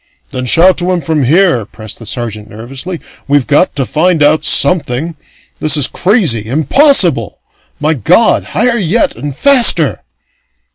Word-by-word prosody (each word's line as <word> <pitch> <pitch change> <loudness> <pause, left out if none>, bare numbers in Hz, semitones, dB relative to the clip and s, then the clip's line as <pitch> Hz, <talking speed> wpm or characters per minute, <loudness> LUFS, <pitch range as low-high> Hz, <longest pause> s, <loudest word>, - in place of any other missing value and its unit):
"Then 125 0 -5
shout 180 +8 +3
to 180 +1 -3
him 180 -2 -2
from 150 -2 -2
here," 160 - +1
pressed 110 0 -11
the 115 - -11
sergeant 110 -4 -6
nervously. 135 - -8 0.3
"We've 145 -2 +1
got 155 +5 0
to 135 -2 -2
find 160 +3 0
out 150 +2 +2
something! 155 -1 +1 0.4
This 155 -1 +1
is 145 - +4
crazy 180 - 0
impossible! 160 - +2 0.4
My 155 +2 0
God! 175 - +1
Higher 235 +1 0
yet 235 - 0
and 145 -2 -7
faster!" 235 - +3
155 Hz, 145 wpm, -10 LUFS, 130-185 Hz, 0.4 s, is